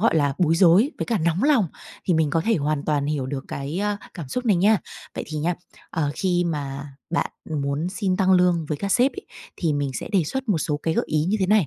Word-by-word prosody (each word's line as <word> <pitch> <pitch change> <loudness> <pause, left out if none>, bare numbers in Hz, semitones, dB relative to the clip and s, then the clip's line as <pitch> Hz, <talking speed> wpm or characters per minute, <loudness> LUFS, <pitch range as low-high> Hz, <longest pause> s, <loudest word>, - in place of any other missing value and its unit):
gọi 210 -6 +3
là, 145 -2 +2
bối 165 -2 +3
rối 185 - +5
với - - -2
cả 230 -3 +1
nóng 170 +3 +1
lòng 275 -8 +4 0.4
thì 180 - +2
mình 160 -2 +2
có 165 +1 +2
thể 225 +4 +2
hoàn 150 -1 -1
toàn 145 -2 0
hiểu 145 -3 -1
được 135 0 -4
cái, 140 +6 -4
a, 205 0 0 0.2
cảm 165 -8 -7
xúc 250 - -3
này 205 - +4
nha. 205 +3 +4 0.4
Vậy - - -4
thì 155 0 -4
nha, 170 +4 0 0.4
ờ, 150 -3 0
khi 175 -1 +1
mà 140 -3 -3 0.2
bạn 170 - 0 0.2
muốn 145 +2 -1
xin 185 0 -1
tăng 190 -1 +3
lương 180 -3 +3
với 150 - -1
các 200 -1 -1
sếp 255 +3 +4
ấy, 395 - -9 0.3
thì 165 -4 0
mình 145 -1 -1
sẽ - - -5
đề 190 -5 +3
xuất 265 - -4
một 190 -6 +2
số 150 -3 -1
cái 160 +2 -2
gợi - - +1
ý 155 0 +1
như 195 +5 +1
thế 190 - +2
này. 205 -4 +4
170 Hz, 255 wpm, -24 LUFS, 150-195 Hz, 0.4 s, rối